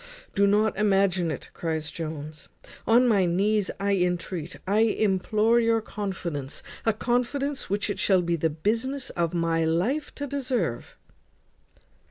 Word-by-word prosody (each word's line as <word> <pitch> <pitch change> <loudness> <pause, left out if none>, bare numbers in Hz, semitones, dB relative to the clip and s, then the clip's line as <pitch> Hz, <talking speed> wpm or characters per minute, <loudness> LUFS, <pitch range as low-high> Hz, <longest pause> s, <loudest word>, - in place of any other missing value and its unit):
"Do 200 0 +3
not 210 +1 +3
imagine 195 -4 +2
it," 155 - -6
cries 160 -1 -3
Jones. 155 -2 -7 0.4
"On 240 +2 +5
my 200 -6 +3
knees 200 +3 +1
I 200 +1 0
intreat, 180 -2 -1
I 200 +3 +2
implore 215 +1 +2
your 230 -1 +3
confidence, 185 -10 -5 0.2
a - - +6
confidence 250 +5 -1
which 205 +2 0
it 205 - -3
shall 185 -3 +3
be 170 0 0
the 160 0 0
business 230 - -1
of 170 -2 -1
my 165 -1 +1
life 185 - 0
to 285 - -4
deserve." 255 - -2
195 Hz, 140 wpm, -26 LUFS, 170-225 Hz, 0.4 s, a